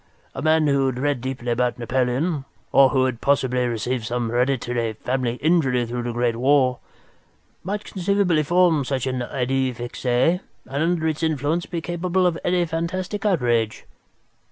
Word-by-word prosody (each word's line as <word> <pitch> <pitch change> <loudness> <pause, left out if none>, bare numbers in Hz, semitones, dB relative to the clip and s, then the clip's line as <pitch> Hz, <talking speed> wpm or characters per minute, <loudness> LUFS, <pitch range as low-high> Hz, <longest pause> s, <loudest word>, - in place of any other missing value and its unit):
A 135 - -5
man 155 +1 +3
who 140 -2 +2
had 130 -2 -2
read 140 -1 0
deeply 125 -2 -3
about 120 +1 0
Napoleon, 130 +5 0 0.3
or 135 -1 +6
who 130 0 +2
had 125 -3 -3
possibly 125 -3 +1
received 120 +1 -2
some 120 0 -2
hereditary 120 -2 0
family 125 +2 -2
injury 135 -5 +2
through 120 +1 -4
the 120 0 -3
great 120 -1 0
war, 130 0 +3 0.8
might 205 +3 -3
conceivably 190 -3 +1
form 170 -1 +3
such 130 -1 -2
an 130 -1 -2
idée 130 0 -1
fixe 120 +2 -7
and 130 +9 +3 0.3
under 160 +4 0
its 155 0 -2
influence 160 +1 0
be 170 -2 -4
capable 175 +2 0
of 175 -2 +2
any 175 -1 +2
fantastic 185 +5 -3
outrage." 120 - 0
135 Hz, 155 wpm, -23 LUFS, 125-165 Hz, 0.8 s, or